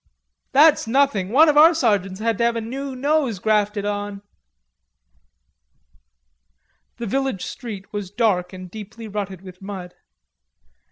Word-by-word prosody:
"That's 295 -2 +5
nothing; 240 -7 +2
one 295 +8 +6
of 295 -1 +3
our 320 +3 +8
sergeants 205 - 0
had 225 -1 -1
to - - +2
have 235 0 +2
a - - -1
new 265 +4 -5
nose 280 -4 0
grafted 210 0 0
on...." 205 -1 -4 2.7
The 235 - -5
village 265 -3 -2
street 215 -6 -8
was 205 -3 -4
dark 200 -4 0
and 185 -2 -10
deeply 220 +2 -9
rutted 195 -3 -5
with 185 -1 -12
mud. 190 -3 -7
215 Hz, 130 wpm, -22 LUFS, 195-260 Hz, 2.7 s, our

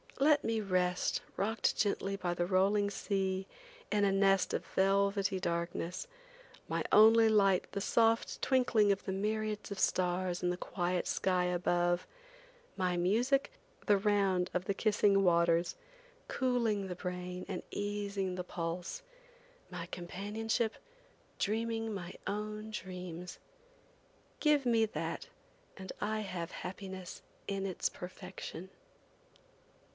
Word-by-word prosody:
Let 295 +1 +5
me 225 -1 0
rest 180 -2 +1 0.2
rocked 220 +3 +1
gently 200 -1 0
by 180 -3 -2
the 175 0 0
rolling 200 +2 +3
sea, 190 -1 -1 0.4
in 205 -1 +2
a 200 - +4
nest 195 -1 +3
of - - -2
velvety 195 0 +2
darkness, 170 - -2 0.6
my - - -1
only 225 +1 +8
light 195 -4 +3
the 200 - -3
soft 225 +2 +2
twinkling 240 -6 +3
of 195 - -1
the 190 - -2
myriads 215 +2 -2
of 200 - -4
stars 180 0 +1
in 180 - +2
the 180 - -1
quiet 180 0 -1
sky 180 -1 +1
above; 175 0 +1 0.7
my 180 -2 +1
music, 245 - +2 0.3
the 205 -2 +5
round 195 -3 +2
of 180 0 0
the 200 - 0
kissing 205 -2 +3
waters, 170 -1 +3 0.5
cooling 235 -6 0
the 180 - -4
brain 180 0 -5
and 185 -3 -4
easing 200 -2 -2
the 180 - -3
pulse; 175 - -4 0.7
my 180 -2 -5
companionship, 210 +6 -2 0.6
dreaming 225 +1 -1
my 180 -2 -6
own 215 +1 -4
dreams. 180 -3 -6 1.0
Give 300 -3 +3
me 230 -2 +4
that 215 - -4 0.5
and 190 -1 -7
I 215 +1 -1
have 180 -5 -4
happiness 185 0 -7 0.3
in 195 -1 -2
its 185 - -1
perfection. 185 0 -8
195 Hz, 125 wpm, -33 LUFS, 180-215 Hz, 1.0 s, only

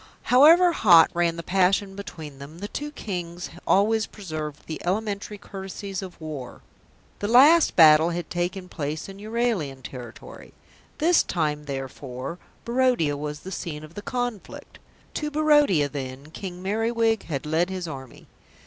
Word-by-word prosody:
However 330 +7 +7
hot 175 - +6
ran 170 -1 +1
the 170 - -6
passion 195 +2 +1
between 160 -8 -9
them, 145 +4 -10
the 200 +3 -5
two 295 +7 -5
Kings 180 - -6 0.2
always 215 +3 +3
preserved 155 -7 -7
the 160 - -6
elementary 205 +2 -2
courtesies 195 -1 -7
of 185 -2 -9
war. 150 -6 -7 0.6
The 205 - -2
last 290 +9 +6
battle 160 0 +7
had 175 0 -4
taken 180 +2 -2
place 155 -2 -4
in 195 0 -10
Euralian 210 - -2
territory; 120 -3 -10 0.4
this 340 +3 +4
time, 150 -3 -2
therefore, 135 +2 -6 0.3
Barodia 235 - +2
was 150 +1 -5
the 190 - -8
scene 155 -4 -5
of 155 +1 -12
the 205 - -7
conflict. 245 -2 -5 0.3
To 300 - -2
Barodia, 295 - +3
then, 140 +1 -7
King 180 0 -7
Merriwig 225 +2 0
had 145 -4 -4
led 160 +4 +1
his 185 -2 -4
army. 135 -4 -9
180 Hz, 145 wpm, -25 LUFS, 150-215 Hz, 0.6 s, However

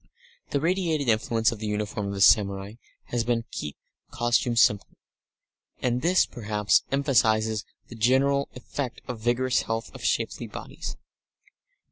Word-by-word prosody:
The 140 - 0
radiated 165 -3 0
influence 110 +1 +2
of 115 - -7
the 110 - -4
uniform 105 0 -2
of 100 - -4
the 100 - -3
samurai 100 0 +4 0.4
has 120 -1 0
been 115 0 0
to - - -40
keep 75 - -5 0.3
costume 120 0 +1
simple, 105 -3 +2 0.8
and 125 0 0
this, 180 +3 +4
perhaps, 105 -3 +1
emphasises 110 -6 +2 0.2
the - - -11
general 135 +5 +2
effect 125 0 -5
of 125 -3 -5
vigorous 120 +3 +1
health, 115 0 -4
of - - -10
shapely - - -1
bodies. - - -7
115 Hz, 140 wpm, -26 LUFS, 105-130 Hz, 0.8 s, samurai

